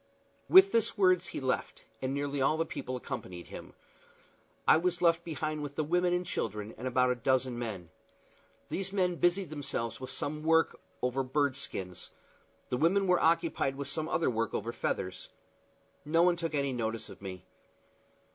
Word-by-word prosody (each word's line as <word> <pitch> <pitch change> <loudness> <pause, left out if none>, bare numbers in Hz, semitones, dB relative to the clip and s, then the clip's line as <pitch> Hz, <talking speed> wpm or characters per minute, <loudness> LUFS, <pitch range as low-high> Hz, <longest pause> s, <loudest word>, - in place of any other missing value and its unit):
With 385 +2 +9
these 225 -1 +1
words 185 -2 +4
he - - -5
left, 130 -1 -2 0.2
and 130 - -1
nearly 140 0 -2
all 150 +4 +3
the 165 - +1
people 130 -4 -5
accompanied 90 -7 -6
him. - - -10 0.9
I - - +8
was 175 +1 0
left 165 -1 +3
behind 155 -2 -3
with 145 -1 -6
the 155 - 0
women 175 +3 +2
and 180 0 0
children 105 - -3
and 125 - -5
about 125 0 +3
a - - +1
dozen 130 -1 +1
men. 100 -8 -5 0.8
These 195 0 -2
men 180 -3 +1
busied 175 -1 +1
themselves 135 -6 -3
with 130 - -5
some 150 +1 -2
work 160 +1 +3 0.2
over 125 +2 +1
bird 140 +1 +1
skins; 95 -9 -6 0.6
the 125 - 0
women 185 +7 +3
were 180 -1 +4
occupied 165 -4 +2
with 140 0 -4
some 155 +2 -3
other 165 -7 +1
work 115 0 -1
over 115 +3 -2
feathers. 95 -5 -3 0.7
No 165 +3 +3
one 180 0 +4
took 165 -2 -3
any 140 -2 0
notice 115 -2 -3
of - - -12
me. 95 -3 -7
145 Hz, 175 wpm, -31 LUFS, 125-170 Hz, 0.9 s, With